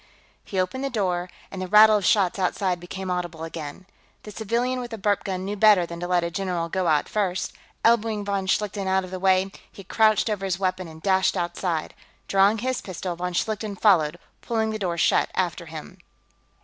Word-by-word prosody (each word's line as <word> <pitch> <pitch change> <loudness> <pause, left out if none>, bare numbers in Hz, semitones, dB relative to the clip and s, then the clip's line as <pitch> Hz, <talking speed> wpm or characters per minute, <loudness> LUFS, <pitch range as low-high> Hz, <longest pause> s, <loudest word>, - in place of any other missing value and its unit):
He 190 - -3
opened 185 +9 -1
the 275 - -1
door, 185 -6 -1 0.2
and 190 - -6
the 185 - -3
rattle 215 +2 +7
of 200 - -3
shots 195 -2 +3
outside 185 -1 0
became 185 +2 -6
audible 175 -3 -3
again. 165 +1 -7 0.4
The 210 - -9
civilian 235 +5 -1
with 245 -1 -5
the 225 - -6
burp 205 0 0
gun 190 -2 -3
knew 205 +1 -3
better 210 -3 +5
than 170 0 -8
to 175 - -4
let 180 -1 +2
a 170 - -2
general 175 -2 -2
go 185 0 -1
out 150 -2 +2
first; 190 -4 -1 0.3
elbowing 225 -2 +2
von 200 -1 -2
Schlichten 200 0 -1
out 190 0 +2
of 185 - -9
the 185 - -4
way, 190 0 +2 0.2
he 195 - -11
crouched 215 +3 +3
over 210 -3 -2
his 185 -2 -1
weapon 185 -1 -2
and 160 0 -13
dashed 190 -1 +2
outside. 175 -1 -2 0.3
Drawing 195 +3 +4
his 255 +3 -2
pistol, 180 -1 -5
von 180 +1 -4
Schlichten 215 +2 -2
followed, 175 -6 +3 0.2
pulling 220 -2 -1
the 215 - -4
door 175 -4 -2
shut 165 - +3
after 175 -2 -1
him. 160 -1 -9
190 Hz, 200 wpm, -24 LUFS, 175-210 Hz, 0.4 s, rattle